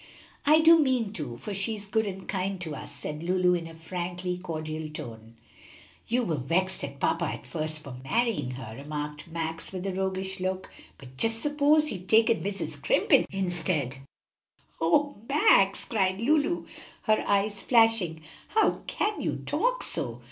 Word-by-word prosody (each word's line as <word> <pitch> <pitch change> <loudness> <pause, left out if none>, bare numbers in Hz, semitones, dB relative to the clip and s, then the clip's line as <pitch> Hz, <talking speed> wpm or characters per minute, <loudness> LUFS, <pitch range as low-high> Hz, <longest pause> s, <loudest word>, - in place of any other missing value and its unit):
"I 310 +2 +7
do 330 +1 +8
mean 255 -8 +1
to, 145 - -5
for 205 - -6
she 200 +3 -1
is 205 -1 -8
good 220 +1 0
and 190 -1 -6
kind 190 0 -2
to 160 -4 -4
us," - - -8
said 150 0 -6
Lulu, 180 +1 +2
in 170 -2 -2
a 165 - -11
frankly 180 +2 -4
cordial 155 -3 -4
tone. 115 -6 -9 0.7
"You 245 +2 +1
were 165 -8 -1
vexed 180 +8 0
at 140 0 -6
papa - - +1
at - - -5
first 155 -1 -4
for 135 -4 -8
marrying 215 - 0
her," 115 -4 -8
remarked 150 +2 -5
Max, 165 0 -4
with 185 0 -5
a 195 - -1
roguish 190 0 -2
look; 185 0 -3 0.3
"but 130 -2 -14
just 225 +7 +2
suppose 295 +2 +3
he'd 185 -5 -7
taken 225 0 +5
Mrs. 195 -5 -3
Scrimp 145 -1 +1 0.2
instead." 175 -8 0 0.8
"O 285 - +2
Max!" 195 -9 +4
cried 190 -4 0
Lulu, 300 +7 +2 0.4
her 215 -1 +2
eyes 200 0 +1
flashing, 225 -9 +3 0.3
"how 440 - +2
can 420 0 -1
you - - -2
talk - - +1
so? 120 -3 -1
185 Hz, 160 wpm, -28 LUFS, 155-220 Hz, 0.8 s, do